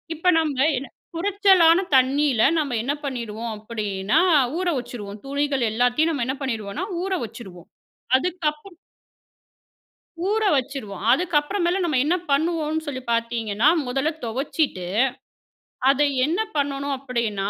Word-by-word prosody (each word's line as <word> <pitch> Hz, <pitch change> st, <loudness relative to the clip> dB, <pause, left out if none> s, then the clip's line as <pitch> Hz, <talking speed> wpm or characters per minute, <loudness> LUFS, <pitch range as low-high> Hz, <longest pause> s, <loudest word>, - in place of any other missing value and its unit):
இப்ப 360 Hz, +3 st, +3 dB
நாம 295 Hz, -2 st, +1 dB
என்ன 275 Hz, -, -6 dB, 0.3 s
குறச்சலான 380 Hz, -2 st, +4 dB, 0.2 s
தண்ணில 265 Hz, -2 st, +3 dB, 0.2 s
நம்ப 285 Hz, -5 st, -1 dB
என்ன 280 Hz, +4 st, 0 dB
பண்ணிடுவோம் 235 Hz, -3 st, -4 dB
அப்டின்னா, 210 Hz, -2 st, -1 dB, 0.4 s
ஊற 370 Hz, -, -1 dB
வச்சுருவோம், 215 Hz, -4 st, -8 dB
துணிகள் 280 Hz, -2 st, -1 dB
எல்லாத்தையும் 245 Hz, +8 st, +2 dB
நாம 265 Hz, -6 st, -1 dB
என்ன 265 Hz, -, -1 dB
பண்ணிருவோம்னா, 230 Hz, -, -3 dB, 0.2 s
ஊற 385 Hz, -, -3 dB
வச்சுருவோம். 195 Hz, -6 st, -10 dB, 0.5 s
அதுக்கப்பறம் 335 Hz, +2 st, -3 dB, 1.5 s
ஊற 440 Hz, +1 st, +1 dB
வச்சுருவோம். 260 Hz, -7 st, -4 dB
அதுக்கு 345 Hz, +4 st, 0 dB
அப்புறம் 345 Hz, +5 st, -3 dB
மேல 370 Hz, +3 st, +1 dB
நம்ம 305 Hz, -7 st, +1 dB
என்னா 350 Hz, +5 st, +1 dB
பண்ணுவோம்னு 315 Hz, +1 st, 0 dB
சொல்லி 260 Hz, -3 st, -5 dB
பாத்தீங்கன்னா, 230 Hz, +1 st, +1 dB, 0.2 s
முதல்ல 270 Hz, +4 st, 0 dB
தொவச்சிட்டு, 245 Hz, -, -2 dB, 1.0 s
அத 275 Hz, -, +3 dB, 0.3 s
என்ன 325 Hz, +6 st, -1 dB, 0.2 s
பண்ணனும் 280 Hz, 0 st, -1 dB
அப்டின்னா, 235 Hz, -7 st, -2 dB
275 Hz, 120 wpm, -23 LUFS, 230-315 Hz, 1.5 s, குறச்சலான